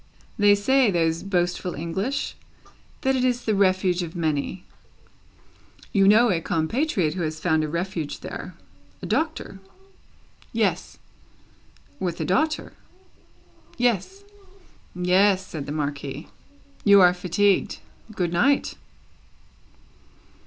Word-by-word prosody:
"They 205 0 +6
say, 260 +4 +3
those 165 -3 +1
boastful 180 -2 -1
English, 190 - -3 0.7
that 265 0 +1
it 255 - 0
is 245 -1 0
the 220 - +1
Refuge 185 -2 +2
of 170 -1 -6
many. 160 +2 -2 1.3
You 195 -1 +4
know 220 +3 +6
a 170 -3 0
compatriot 170 - 0
who 185 - -4
has 155 -1 -3
found 160 -2 +1
a - - -1
Refuge 170 -1 -4
there? - - -7 0.5
A - - -3
Doctor?" 310 -10 -2 0.9
"Yes." - - -1 1.0
"With 175 -3 -3
a - - -1
daughter?" 305 +12 0 1.0
"Yes." 245 - 0 0.7
"Yes," 185 +2 +3
said 150 -6 -7
the - - -4
Marquis. 145 0 -4 0.6
"You 200 -1 +7
are 180 -1 +6
fatigued. 185 +2 +1 0.4
Good 175 -2 -1
night!" 275 +11 +2
185 Hz, 110 wpm, -24 LUFS, 165-205 Hz, 1.3 s, You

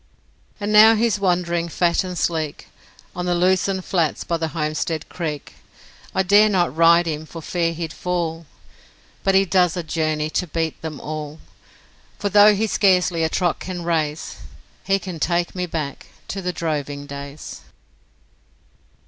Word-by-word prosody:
And 205 +1 -2
now 220 +2 +8
he's 220 -2 +1
wandering, 175 -3 0
fat 170 +1 +1
and 180 -1 -5
sleek, 155 -1 -2 0.5
On 180 0 -3
the 175 - +1
lucerne 185 +2 +2
flats 170 -4 -1
by 170 - -1
the 160 0 -2
Homestead 155 0 -2
Creek; 155 -5 -5 0.6
I 190 - +3
dare 205 +3 +5
not 175 -8 +1
ride 170 +1 +5
him 155 -1 -4
for 165 - -9
fear 165 +1 -1
he'd 165 -1 -5
fall, 170 -3 -3 0.8
But 195 0 +2
he 195 0 +5
does 180 -2 +2
a 175 - -2
journey 155 -1 -1
to 180 - -1
beat 160 0 -3
them 155 -3 -6
all, 155 0 -6 0.8
For 205 - -2
though 205 +1 +7
he 215 +3 0
scarcely 180 -5 +2
a 160 - +1
trot 175 0 0
can 180 -2 -5
raise, 160 -2 -2 0.5
He 195 0 +3
can 185 -4 -7
take 170 +2 0
me 180 -1 -3
back 150 -5 -5 0.2
to 195 - -4
the 180 -1 -2
droving 145 -4 -3
days. 140 +1 -8
170 Hz, 155 wpm, -21 LUFS, 155-185 Hz, 0.8 s, now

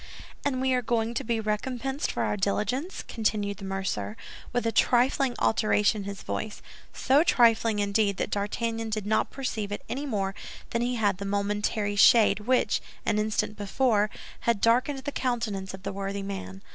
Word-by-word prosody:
"And 275 -3 0
we 260 0 +2
are 250 - +2
going 230 -1 0
to - - -2
be 230 0 0
recompensed 250 +6 -2
for - - -1
our - - 0
diligence?" 210 - -1
continued 210 -3 -1
the 195 - -8
mercer, 190 - -3 0.3
with 245 -1 -1
a 230 - +2
trifling 250 +2 +3
alteration 215 -1 +2
in 200 - -5
his 200 - -7
voice—so 260 +6 -1
trifling, 230 -7 +4
indeed, 200 -1 +1
that - - -2
D'Artagnan 225 +2 -2
did 215 -2 -2
not 215 +1 +1
perceive 220 -6 -3
it 205 - -4
any 285 +3 -3
more 195 -6 -1 0.4
than 235 - 0
he 245 +1 0
had 205 -4 +1
the 200 - -4
momentary 205 +1 -1
shade 210 -1 +6
which, 250 +4 +1 0.2
an 210 - +2
instant 215 0 0
before, 210 +1 +1 0.3
had 235 -3 +1
darkened 250 +6 +3
the 285 - -3
countenance 225 -8 -2
of 190 0 -10
the - - -4
worthy 195 0 -3
man. 195 0 -6
215 Hz, 170 wpm, -27 LUFS, 200-240 Hz, 0.4 s, shade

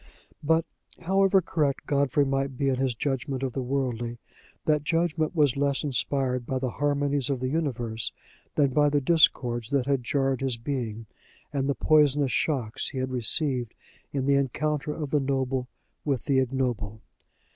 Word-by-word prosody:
But, 160 +2 +2 0.4
however 195 +1 +3
correct 150 -4 0
Godfrey 140 0 +2
might 135 -1 -1
be 135 +1 +1
in 130 - +1
his 130 -2 0
judgment 135 0 -2
of 130 -3 -2
the 135 - -2
worldly, 125 -3 -2 0.5
that 150 -1 +3
judgment 165 0 0
was 145 -5 +3
less 140 0 +1
inspired 130 -2 0
by 130 - -1
the 130 -1 -2
harmonies 145 0 0
of 135 -3 0
the 130 0 -1
universe 120 -8 -2 0.4
than 140 -3 +3
by 145 +1 +4
the 145 0 +2
discords 125 -6 +2
that 140 -3 +1
had 135 -2 0
jarred 135 0 0
his 130 -3 -1
being 115 -3 -4 0.5
and 140 -1 0
the 140 - +1
poisonous 145 -3 +3
shocks 125 -6 -1
he - - -6
had 130 0 -2
received 125 -1 0 0.4
in 135 -2 -1
the 140 - +3
encounter 150 +2 -1
of 150 -2 -5
the 150 - +3
noble 135 -2 -1 0.4
with 135 -5 -1
the 135 -2 +3
ignoble. 120 -5 -2
135 Hz, 165 wpm, -27 LUFS, 125-145 Hz, 0.5 s, by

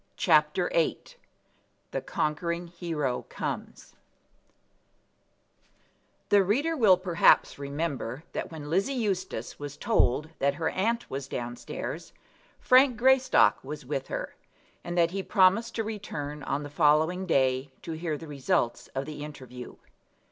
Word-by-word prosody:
CHAPTER - - +3
VIII - - +2 0.9
The - - -2
Conquering 170 +3 -2
Hero 160 -7 -3
Comes - - -5 2.4
The 200 -1 +6
reader 280 - +1
will 210 - +6
perhaps 175 -5 +3
remember 140 -2 -3
that - - -4
when 155 -2 -7
Lizzie 200 +11 +1
Eustace 190 - -3
was 145 0 -7
told 155 - +1
that 140 0 +2
her 160 0 -1
aunt 230 +5 -1
was 135 0 -4
down 120 -2 -4
stairs 120 - -6 0.5
Frank 255 -1 +5
Greystock 260 +2 +4
was 145 0 -7
with 135 0 -3
her, - - -4 0.5
and 175 0 -4
that 170 -1 +4
he 195 +1 -2
promised 195 +3 +3
to 225 - 0
return 150 -9 -5
on 140 +2 -1
the 145 - -8
following 160 +4 +3
day 130 -3 +1
to 165 - -5
hear 160 -1 -3
the 160 - -10
result 135 -4 -1
of 135 +1 -2
the 150 0 -7
interview. 130 -4 -9
160 Hz, 135 wpm, -28 LUFS, 140-195 Hz, 2.4 s, The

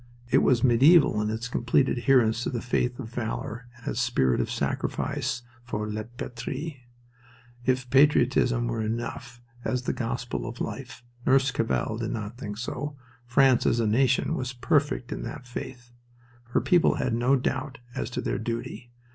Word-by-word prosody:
It - - +6
was 120 -3 +3
medieval 130 -1 +6
in 105 - -1
its 110 +2 -3
complete 125 +2 +2
adherence 120 -3 +3
to - - -1
the 120 - -2
faith 125 0 0
of 115 -4 -6
valor 120 +1 -4
and 120 - -14
its 120 - -1
spirit 65 - +2
of - - -2
sacrifice 120 - -2 0.2
for 105 -3 -3
La 105 0 -4
Patrie. 130 +3 -6 0.8
If 130 -1 +1
patriotism 125 -3 +4
were 115 -1 -2
enough 120 +1 -4 0.2
as 125 -1 -1
the - - -1
gospel 120 +1 -3
of 120 +1 -7
life 130 -3 -6 0.2
Nurse 135 +1 +4
Cavell 115 -1 -1
did 115 -2 -2
not 110 -1 -4
think 105 -4 -6
so 140 +5 -4 0.3
France 130 0 +4
as 120 - +2
a 115 - +2
nation 125 +4 +2
was 130 0 -3
perfect 145 -1 0
in - - -4
that 130 +3 -7
faith. 120 0 -8 0.5
Her 120 - 0
people 175 -2 +4
had 120 - -1
no 120 +4 +3
doubt 135 +1 -2 0.2
as 110 - -3
to 125 - -3
their - - -2
duty. 115 +1 -5
120 Hz, 165 wpm, -27 LUFS, 115-130 Hz, 0.8 s, It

